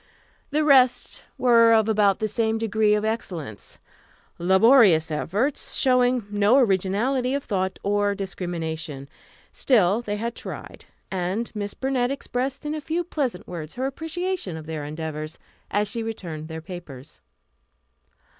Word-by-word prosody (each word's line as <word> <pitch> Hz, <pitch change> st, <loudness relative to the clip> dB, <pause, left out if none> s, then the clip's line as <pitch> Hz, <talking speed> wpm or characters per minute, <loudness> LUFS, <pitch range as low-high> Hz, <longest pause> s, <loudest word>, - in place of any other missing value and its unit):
The 305 Hz, +1 st, +1 dB
rest 255 Hz, -4 st, +4 dB, 0.2 s
were 230 Hz, -2 st, +5 dB
of 220 Hz, -1 st, +4 dB
about 205 Hz, -3 st, +3 dB
the 215 Hz, -, -1 dB
same 220 Hz, 0 st, 0 dB
degree 220 Hz, -1 st, +2 dB
of 210 Hz, 0 st, -1 dB
excellence 170 Hz, -, -5 dB, 0.6 s
laborious 190 Hz, -, +5 dB
efforts, 210 Hz, -, -1 dB
showing 250 Hz, -3 st, +3 dB
no 205 Hz, +4 st, +4 dB
originality 240 Hz, +4 st, +1 dB
of 280 Hz, -, -2 dB
thought 190 Hz, -2 st, -2 dB
or 205 Hz, 0 st, +1 dB
discrimination. 160 Hz, -7 st, -5 dB, 0.4 s
Still, 215 Hz, -4 st, +3 dB
they 210 Hz, -3 st, -3 dB
had 230 Hz, +2 st, -3 dB
tried, -, -, -9 dB, 0.3 s
and 190 Hz, +5 st, -2 dB
Miss 205 Hz, -2 st, -4 dB
Burnett 260 Hz, -2 st, 0 dB
expressed 270 Hz, +1 st, -3 dB
in 295 Hz, -, -2 dB
a 310 Hz, -, -4 dB
few 325 Hz, +4 st, -2 dB
pleasant 270 Hz, -, -3 dB
words 165 Hz, -3 st, -7 dB
her 255 Hz, +1 st, -2 dB
appreciation 325 Hz, -, -3 dB
of 155 Hz, -, -9 dB
their 155 Hz, -2 st, -5 dB
endeavors, 155 Hz, 0 st, -5 dB, 0.3 s
as 205 Hz, +1 st, 0 dB
she 230 Hz, +3 st, -4 dB
returned 170 Hz, -9 st, -5 dB
their 160 Hz, 0 st, -6 dB
papers. 160 Hz, -6 st, -10 dB
210 Hz, 135 wpm, -24 LUFS, 175-250 Hz, 0.6 s, were